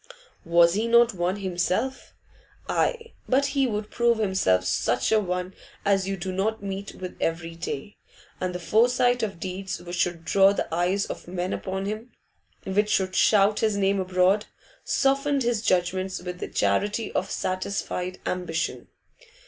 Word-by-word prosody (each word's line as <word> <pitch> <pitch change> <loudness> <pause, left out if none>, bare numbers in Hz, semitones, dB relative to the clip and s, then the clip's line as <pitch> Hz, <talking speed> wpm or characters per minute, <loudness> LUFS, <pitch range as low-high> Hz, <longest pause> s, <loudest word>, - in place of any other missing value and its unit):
Was 170 0 +5
he 215 +4 0
not 235 0 +5
one 180 +1 -1
himself? 190 +7 -2 0.5
Aye, 460 -1 -1 0.2
but 270 +2 +3
he 275 -2 +2
would 210 -2 -3
prove 235 -1 +2
himself 190 - +2
such 115 +6 +1
a 220 - +5
one 180 -1 -3 0.3
as 195 -1 +2
you 195 0 -2
do 185 +1 -4
not 200 +3 -1
meet 195 0 -5
with 185 -1 -7
every 165 0 -2
day; 170 +2 -6 0.4
and 180 -1 -2
the - - -3
foresight 245 +6 +3
of 195 -5 -3
deeds 190 +1 -4
which 175 0 -6
should 170 -2 -1
draw 195 0 +5
the - - -2
eyes 180 +4 +1
of - - -7
men 180 +1 -3
upon 190 0 -3
him, 215 +4 -5 0.6
which 205 +2 +1
should 185 -2 +1
shout 205 0 +4
his 215 -2 +1
name 195 0 +2
abroad, 185 +2 +2 0.4
softened 275 0 +1
his 235 -3 0
judgments 185 -1 0
with 180 0 -7
the - - -4
charity 205 - 0
of 190 - -1
satisfied 185 -1 -3
ambition. 175 -3 -2
190 Hz, 155 wpm, -25 LUFS, 180-215 Hz, 0.6 s, Was